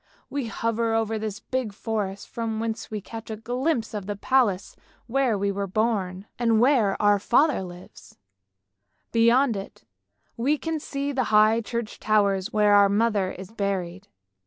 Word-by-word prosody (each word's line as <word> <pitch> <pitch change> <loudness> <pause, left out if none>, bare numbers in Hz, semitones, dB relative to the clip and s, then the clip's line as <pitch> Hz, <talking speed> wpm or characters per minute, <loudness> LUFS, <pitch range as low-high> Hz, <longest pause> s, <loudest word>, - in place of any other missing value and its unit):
We 280 -4 -2
hover 230 0 -1
over 225 -1 0
this 215 0 -4
big 255 -5 -3
forest 205 -2 -3
from 225 -2 -3
whence 225 0 -3
we 215 -1 -4
catch 225 +3 -9
a 220 - -3
glimpse 245 +2 -1
of 205 -3 -5
the 205 - -2
palace 205 -4 +1 0.3
where 250 -2 +1
we 200 0 0
were 200 0 -3
born, 195 -2 -1
and 230 -2 +3
where 235 -6 +3
our 205 -1 +4
father 265 +5 +3
lives; 180 -1 -12 0.9
beyond 235 +2 +4
it 195 0 -8 0.5
we 275 +6 +1
can 325 +1 -3
see 280 -1 -3
the 260 -3 0
high 215 +1 +4
church 230 0 -5
towers 200 -1 +1
where 210 -1 +4
our 200 -1 +6
mother 205 -2 +1
is 190 +2 -10
buried. 195 -3 -3
220 Hz, 160 wpm, -25 LUFS, 200-235 Hz, 0.9 s, our